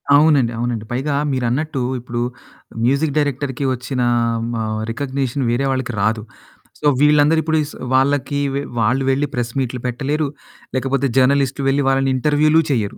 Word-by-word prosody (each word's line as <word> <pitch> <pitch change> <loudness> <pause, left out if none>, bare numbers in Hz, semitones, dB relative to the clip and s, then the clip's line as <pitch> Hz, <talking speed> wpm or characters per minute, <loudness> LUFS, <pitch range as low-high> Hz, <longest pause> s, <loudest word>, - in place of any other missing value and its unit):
అవునండి. 145 -6 +4
అవునండి. 115 -2 -2
పైగా 140 +4 -1 0.2
మీరన్నట్టు 130 +3 -1 0.2
ఇప్పుడు 120 0 -4 0.6
మ్యూజిక్ 140 +4 +1
డైరెక్టర్‌కి 140 -2 -1
వచ్చిన 125 +1 -3 0.2
ఆహ్, 115 -1 -1
మ - - -2 0.3
రికగ్‌నిషన్ 135 +1 -2
వేరే 135 +3 0
వాళ్ళకి 130 -2 -2
రాదు. 110 0 +1 0.6
సో 150 - +1
వీళ్ళందరూ 150 +2 +5
ఇప్పుడు‌ 160 0 +1
స్ - - -13 0.2
వాళ్లకి 140 +2 +2 0.2
వే 140 - 0 0.2
వాళ్ళు 125 +5 +2
వెళ్లి 140 +2 0
ప్రెస్‌మీట్లు 125 +1 -2
పెట్టలేరు. 140 +5 -1 0.5
లేకపోతే 135 +1 0
జర్నలిస్టులు 135 +1 +2
వెళ్లి 140 +1 +1
వాళ్ళని 135 0 +2
ఇంటర్‌వ్యూలు 150 +3 +3
చెయ్యరు. 110 -6 -1
135 Hz, 140 wpm, -19 LUFS, 125-145 Hz, 0.6 s, వీళ్ళందరూ